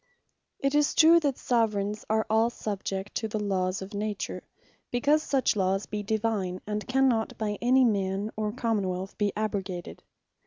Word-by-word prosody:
It 275 Hz, 0 st, 0 dB
is 295 Hz, 0 st, +2 dB
true, 330 Hz, +1 st, +7 dB
that 285 Hz, -5 st, -1 dB
Soveraigns 210 Hz, -3 st, 0 dB
are 220 Hz, 0 st, +2 dB
all 220 Hz, +2 st, +3 dB
subjects 200 Hz, -3 st, -4 dB
to 220 Hz, -, -2 dB
the 215 Hz, -, -3 dB
Lawes 190 Hz, -2 st, -1 dB
of 195 Hz, +3 st, -10 dB
Nature; 210 Hz, 0 st, -3 dB, 0.5 s
because 290 Hz, +5 st, +2 dB
such 270 Hz, -6 st, +1 dB
lawes 195 Hz, 0 st, +1 dB
be 210 Hz, -1 st, -4 dB
Divine, 205 Hz, -3 st, -1 dB
and 210 Hz, 0 st, -3 dB
cannot 255 Hz, -4 st, +2 dB
by 210 Hz, -2 st, -2 dB
any 255 Hz, +2 st, +5 dB
man, 200 Hz, -1 st, 0 dB
or 215 Hz, -1 st, -1 dB
Common 225 Hz, -5 st, -1 dB
wealth 185 Hz, +1 st, -4 dB
be 205 Hz, -1 st, +2 dB
abrogated. 195 Hz, -4 st, -4 dB
215 Hz, 160 wpm, -28 LUFS, 195-235 Hz, 0.5 s, true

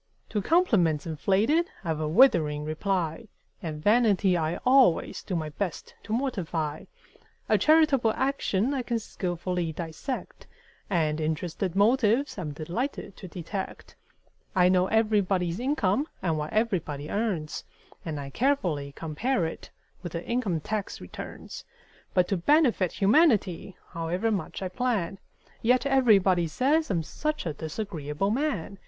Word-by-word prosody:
To 210 Hz, -, -1 dB
compliments 195 Hz, -, +2 dB
inflated 205 Hz, -, +1 dB
I've 160 Hz, -2 st, -2 dB
a 155 Hz, -, -1 dB
withering 155 Hz, -, +4 dB
reply; 170 Hz, +4 st, -2 dB, 0.3 s
And 155 Hz, -3 st, -5 dB
vanity 205 Hz, -4 st, +4 dB
I 160 Hz, 0 st, -1 dB
always 255 Hz, -9 st, +4 dB
do 185 Hz, -, -4 dB
my 155 Hz, -2 st, -2 dB
best 175 Hz, +3 st, -4 dB
to -, -, -10 dB
mortify; 175 Hz, -, -2 dB, 0.6 s
A -, -, +3 dB
charitable 300 Hz, -7 st, +4 dB
action 265 Hz, -3 st, 0 dB
I 270 Hz, -, -1 dB
can 240 Hz, -1 st, -1 dB
skilfully 180 Hz, -4 st, -3 dB
dissect: 165 Hz, -, -6 dB, 0.4 s
And 160 Hz, -4 st, +1 dB
interested 165 Hz, +3 st, -2 dB
motives 230 Hz, +4 st, +2 dB
I'm 155 Hz, -5 st, -4 dB
delighted 175 Hz, -, -4 dB
to 185 Hz, -, -9 dB
detect. 180 Hz, +3 st, -6 dB, 0.6 s
I 180 Hz, -1 st, +5 dB
know 185 Hz, 0 st, +3 dB
everybody's 200 Hz, -5 st, +1 dB
income 255 Hz, -1 st, +1 dB, 0.2 s
and 165 Hz, -3 st, +1 dB
what 150 Hz, 0 st, -3 dB
everybody 170 Hz, -10 st, -1 dB
earns, 195 Hz, -8 st, -2 dB, 0.4 s
And 155 Hz, -3 st, -4 dB
I 140 Hz, -1 st, -7 dB
carefully 175 Hz, -, 0 dB
compare 170 Hz, -, -1 dB
it 160 Hz, -, -6 dB, 0.3 s
with 175 Hz, -4 st, -7 dB
the 170 Hz, 0 st, -4 dB
income 215 Hz, -10 st, -1 dB
tax 210 Hz, +4 st, -4 dB
returns; 90 Hz, -, -9 dB, 0.5 s
But 180 Hz, -1 st, +4 dB
to 195 Hz, -, +1 dB
benefit 235 Hz, -, +3 dB
humanity, 205 Hz, -, +2 dB
however 175 Hz, +7 st, -1 dB
much 195 Hz, -1 st, -3 dB
I -, -, -1 dB
plan, 195 Hz, -3 st, -1 dB, 0.4 s
Yet 250 Hz, +4 st, +3 dB
everybody 200 Hz, -10 st, +4 dB
says 285 Hz, -, +1 dB
I'm 170 Hz, -5 st, 0 dB
such 305 Hz, -, -3 dB
a 160 Hz, -, -2 dB
disagreeable 160 Hz, +1 st, -3 dB
man! 215 Hz, -, -2 dB
190 Hz, 135 wpm, -27 LUFS, 165-235 Hz, 0.6 s, I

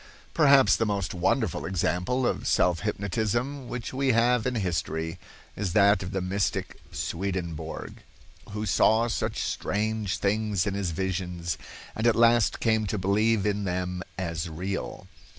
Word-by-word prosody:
Perhaps 140 Hz, -4 st, +6 dB
the 115 Hz, -, +1 dB
most 100 Hz, -3 st, -1 dB
wonderful 95 Hz, -, 0 dB
example 95 Hz, +7 st, 0 dB
of -, -, -1 dB
self 90 Hz, -2 st, +3 dB
hypnotism 110 Hz, -, -2 dB
which 125 Hz, 0 st, -5 dB
we 135 Hz, -1 st, +2 dB
have 120 Hz, +1 st, +3 dB
in 125 Hz, -, -1 dB
history 80 Hz, -4 st, -2 dB, 0.4 s
is 95 Hz, -4 st, -2 dB
that 100 Hz, -1 st, +5 dB
of 90 Hz, -, -4 dB
the 95 Hz, -1 st, -2 dB
mystic 95 Hz, +2 st, -2 dB
Swedenborg, 85 Hz, -4 st, -4 dB, 0.5 s
who 105 Hz, +1 st, -4 dB
saw, 110 Hz, +3 st, +3 dB
such 115 Hz, -, -2 dB
strange 105 Hz, -1 st, -1 dB
things 105 Hz, -2 st, 0 dB
in 100 Hz, -, -1 dB
his 100 Hz, -2 st, -1 dB
visions, 90 Hz, -1 st, -2 dB, 0.4 s
and 110 Hz, +2 st, +1 dB
at 115 Hz, -, +4 dB
last 115 Hz, -1 st, +4 dB
came 110 Hz, -2 st, +1 dB
to 105 Hz, -, -2 dB
believe 105 Hz, +3 st, +2 dB
in 105 Hz, 0 st, 0 dB
them 90 Hz, -1 st, -2 dB, 0.2 s
as 85 Hz, -3 st, -3 dB
real. 95 Hz, +3 st, -4 dB
100 Hz, 145 wpm, -27 LUFS, 90-110 Hz, 0.5 s, Perhaps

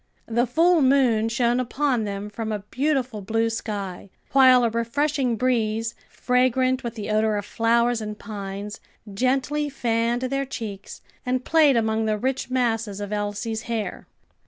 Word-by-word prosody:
The 235 Hz, +2 st, +1 dB
full 330 Hz, +6 st, +4 dB
moon 255 Hz, -5 st, +3 dB
shone 240 Hz, +1 st, +1 dB
upon 255 Hz, -2 st, 0 dB
them 200 Hz, 0 st, -4 dB
from 220 Hz, +1 st, -4 dB
a 210 Hz, -, -1 dB
beautiful 260 Hz, -5 st, 0 dB
blue 225 Hz, +3 st, 0 dB
sky, 200 Hz, -4 st, -5 dB, 0.2 s
while 260 Hz, -2 st, +6 dB
a 230 Hz, -, +2 dB
refreshing 255 Hz, +2 st, 0 dB
breeze, 225 Hz, -2 st, 0 dB, 0.2 s
fragrant 255 Hz, +1 st, +1 dB
with 235 Hz, -1 st, -5 dB
the 215 Hz, -1 st, -4 dB
odor 215 Hz, 0 st, +2 dB
of 205 Hz, -, -4 dB
flowers 235 Hz, +1 st, +1 dB
and 210 Hz, -1 st, -5 dB
pines, 200 Hz, -1 st, -6 dB, 0.3 s
gently 270 Hz, +6 st, 0 dB
fanned 235 Hz, -2 st, 0 dB
their 275 Hz, +2 st, -1 dB
cheeks 215 Hz, -7 st, -7 dB, 0.2 s
and 250 Hz, 0 st, -1 dB
played 305 Hz, -5 st, +4 dB
among 220 Hz, 0 st, +1 dB
the 215 Hz, -1 st, 0 dB
rich 260 Hz, +3 st, -2 dB
masses 225 Hz, -5 st, 0 dB
of 205 Hz, 0 st, -4 dB
Elsie's 210 Hz, +2 st, -3 dB
hair. 215 Hz, -5 st, -3 dB
230 Hz, 150 wpm, -24 LUFS, 215-255 Hz, 0.3 s, while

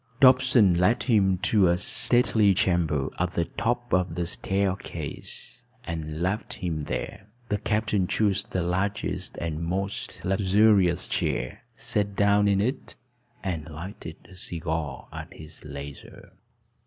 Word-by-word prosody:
Dobson 130 Hz, -6 st, +6 dB
led 105 Hz, +7 st, +3 dB
him 100 Hz, -6 st, +3 dB
to 100 Hz, +1 st, +3 dB
a 85 Hz, 0 st, +3 dB
stately 110 Hz, 0 st, +2 dB
chamber 85 Hz, -7 st, +1 dB
at 90 Hz, 0 st, 0 dB
the 85 Hz, -, 0 dB
top 120 Hz, +4 st, -2 dB
of 90 Hz, -3 st, +1 dB
the 90 Hz, -1 st, -1 dB
staircase, 95 Hz, -, -3 dB, 0.2 s
and 80 Hz, -3 st, -4 dB
left 100 Hz, +4 st, -1 dB
him 80 Hz, -4 st, -3 dB
there. 100 Hz, +6 st, -5 dB, 0.2 s
The 105 Hz, -, 0 dB
captain 105 Hz, -3 st, 0 dB
chose 105 Hz, -1 st, +2 dB
the 100 Hz, -6 st, -2 dB
largest 95 Hz, +1 st, -2 dB
and 80 Hz, -2 st, -3 dB
most 95 Hz, +4 st, -3 dB
luxurious 95 Hz, -1 st, +3 dB
chair, -, -, -2 dB
sat 100 Hz, -1 st, -1 dB
down 100 Hz, 0 st, +4 dB
in 100 Hz, -1 st, +3 dB
it, 130 Hz, +5 st, -2 dB, 0.5 s
and 85 Hz, -5 st, -3 dB
lighted 80 Hz, +1 st, -8 dB
a 95 Hz, -, -15 dB
cigar 80 Hz, -6 st, -4 dB
at -, -, -7 dB
his 80 Hz, 0 st, -11 dB
leisure. 70 Hz, -1 st, -9 dB
95 Hz, 130 wpm, -26 LUFS, 85-105 Hz, 0.5 s, Dobson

